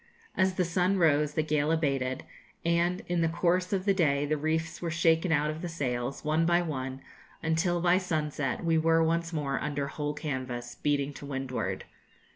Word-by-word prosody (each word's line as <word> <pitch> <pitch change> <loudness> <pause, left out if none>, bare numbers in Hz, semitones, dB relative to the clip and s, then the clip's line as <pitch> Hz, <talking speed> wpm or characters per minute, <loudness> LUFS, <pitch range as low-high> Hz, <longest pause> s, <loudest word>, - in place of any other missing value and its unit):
As 185 0 +2
the 185 - +1
sun 180 +3 +1
rose, 150 -3 +3
the 155 - +2
gale 150 0 +1
abated, 135 -5 0 0.4
and 170 +2 +1
in 175 -1 0
the 165 - +2
course 180 +2 +1
of 195 -2 0
the 200 - +4
day 145 -6 +2
the 155 +1 +1
reefs 160 +2 -2
were 170 - -2
shaken 165 +1 +2
out 150 0 +2
of 155 +1 -7
the 175 - -4
sails, 130 -4 -3
one 155 +2 +2
by 175 +1 +4
one, 135 -4 -4 0.4
until, 165 +2 +1
by 175 +1 +4
sunset, 155 -4 -2
we 165 -1 +3
were 165 +1 +4
once 165 +1 0
more 145 -4 -1
under 145 -1 -2
whole 145 +1 -3
canvas, 130 -5 -4
beating 145 -1 0
to 140 - -9
windward. 125 -8 -3
155 Hz, 185 wpm, -29 LUFS, 140-170 Hz, 0.4 s, the